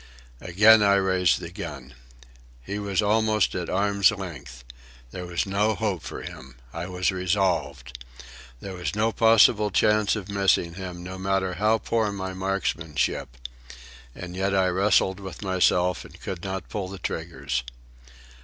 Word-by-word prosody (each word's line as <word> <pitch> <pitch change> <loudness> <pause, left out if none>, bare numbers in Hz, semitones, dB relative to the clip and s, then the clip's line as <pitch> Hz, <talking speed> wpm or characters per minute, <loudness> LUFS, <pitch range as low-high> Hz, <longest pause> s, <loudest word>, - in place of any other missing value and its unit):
Again 105 +5 +5
I 100 -1 +4
raised 95 -2 +2
the 85 -1 -8
gun. 75 -9 -8 0.7
He 100 +7 -4
was 100 -1 0
almost 110 0 +2
at 90 -2 -4
arm's 100 0 +3
length. 80 -11 -7 0.5
There 90 -1 -7
was 85 -1 -1
no 105 +2 +1
hope 100 -7 -2
for - - -7
him. 65 0 -10 0.2
I 85 +2 -5
was 90 0 0
resolved. 85 -10 -1 0.6
There 95 - -7
was 90 +2 -4
no 110 +2 +1
possible 110 -2 +5
chance 105 +2 +2
of 105 -3 -6
missing 100 -4 +1
him, 90 -1 -7
no 95 +1 -7
matter 95 -1 0
how 105 +5 +2
poor 110 -1 -1
my 95 -1 -5
marksmanship. 85 -8 -2 0.8
And 90 0 -8
yet 95 +1 0
I 95 -1 +3
wrestled 95 0 +2
with 95 +1 -8
myself 90 -1 +2
and - - -14
could 90 -3 -6
not 95 -2 -4
pull 100 -3 -4
the 95 +1 -8
triggers. 70 -8 -3
95 Hz, 150 wpm, -25 LUFS, 90-100 Hz, 0.8 s, Again